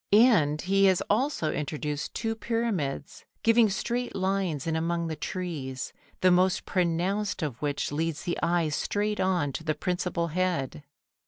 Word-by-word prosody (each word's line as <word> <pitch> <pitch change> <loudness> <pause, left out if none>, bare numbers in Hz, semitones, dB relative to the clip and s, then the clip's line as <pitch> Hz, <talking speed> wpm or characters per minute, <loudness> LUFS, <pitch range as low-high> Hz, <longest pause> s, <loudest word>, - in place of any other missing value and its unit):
And 205 - +5
he 195 +1 +3
has 190 -2 +4
also 225 - +1
introduced 150 0 -3
two 225 -1 -1
pyramids, 225 -11 -2 0.2
giving 230 -1 +5
straight 240 +5 -2
lines 190 -6 0
in 165 -1 0
among 170 +1 0
the 160 - -3
trees, 150 -6 -4 0.3
the 185 - +5
most 185 +1 +3
pronounced 185 +3 0
of 135 -6 -4
which 145 -1 -1
leads 160 +2 -2
the 175 -1 -2
eye 170 -2 +2
straight 210 +7 -1
on 180 -7 +1
to 160 - -5
the 155 -1 0
principal 175 0 -1
head. 170 -5 -1
175 Hz, 150 wpm, -28 LUFS, 155-195 Hz, 0.3 s, And